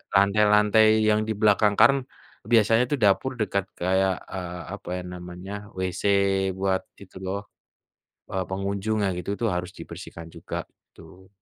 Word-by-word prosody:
lantai-lantai 105 +2 +5 0.2
yang 105 0 +3
di 110 - 0
belakangkan 105 -1 +3
kan 135 0 +6 0.5
biasanya 115 +1 +5
itu 145 - 0
dapur 125 +6 +2
dekat 100 -2 0
kayak, 95 +1 +1 0.2
eee, 90 -2 -5 0.2
apa - - -10
ya 90 - -5
namanya, 90 +2 -8 0.2
WC 95 -1 -3 0.6
buat 95 -1 0 0.2
itu 95 -1 -14
loh, 100 +2 -2 0.9
eee, 95 -1 -1
pengunjungnya, 100 +2 -1
gitu 90 +3 -4
tuh 115 - +2
harus 90 +1 -3
dibersihkan 85 0 -9
juga - - -5 0.3
itu, 95 0 -16
100 Hz, 135 wpm, -25 LUFS, 95-105 Hz, 0.9 s, kan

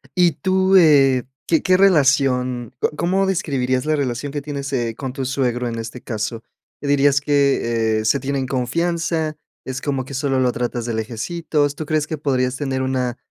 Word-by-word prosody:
Y 175 -2 +4
tú, 190 +3 +2
eh, 135 -6 +5 0.2
¿qué 165 - +2
qué 185 - +3
relación? 135 - +2
¿Co - - +1
cómo 190 +4 +1
describirías 135 -8 0
la 155 0 +2
relación 135 0 -2
que 145 - -4
tienes, 140 -1 -5
eh, 120 -4 -1
con 130 -2 -4
tu 135 - -4
suegro 125 -2 -1
en 115 -1 -4
este 115 +2 -7
caso? 110 0 -4 0.4
¿Dirías 145 -1 +3
que, 120 -6 +1
eh, 110 - -4
se 140 - +3
tienen 135 -1 -2
confianza? 160 +4 -1 0.3
¿Es 130 0 -5
como 135 -3 -2
que 140 - -9
solo 135 -1 0
lo 125 -1 +2
tratas 120 -1 -3
de 120 - -2
lejecitos? 145 +6 -2
¿Tú 155 - -5
crees 155 0 0
que 155 - -4
podrías 130 -3 0
tener 135 -2 -2
una 130 -2 -1
135 Hz, 180 wpm, -20 LUFS, 125-150 Hz, 0.4 s, eh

